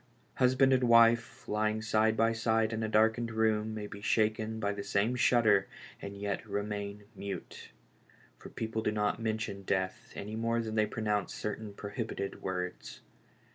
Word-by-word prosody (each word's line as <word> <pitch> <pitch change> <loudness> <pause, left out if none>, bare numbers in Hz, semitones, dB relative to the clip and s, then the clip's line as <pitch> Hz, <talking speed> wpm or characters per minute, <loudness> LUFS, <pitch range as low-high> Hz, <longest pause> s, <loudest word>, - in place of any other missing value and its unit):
Husband 130 +1 +4
and 130 -1 +3
wife 115 +2 +4
lying 110 +1 0
side 110 0 +2
by 115 0 +3
side 115 -1 +1
in 110 - -2
the 110 -1 -1
darkened 110 +2 +3
room 110 -1 +1
may 105 -1 -4
be 100 0 -9
shaken 110 +1 +1
by 100 -1 0
the 100 0 -5
same 105 +6 +1
shudder 110 -5 +4 0.3
and 100 0 -7
yet 100 +1 -2
remain 100 0 -4
mute; 100 0 -7 0.7
for - - -10
people 110 0 -3
do 105 - 0
not 105 +1 0
mention 110 -3 -2
death 95 -1 -2
any 105 +2 -5
more 115 +1 0
than 110 -1 -3
they 110 -1 +2
pronounce 105 -3 -1
certain 105 0 -4
prohibeted 100 -1 -5
words. 90 -1 -5
110 Hz, 160 wpm, -31 LUFS, 100-115 Hz, 0.7 s, Husband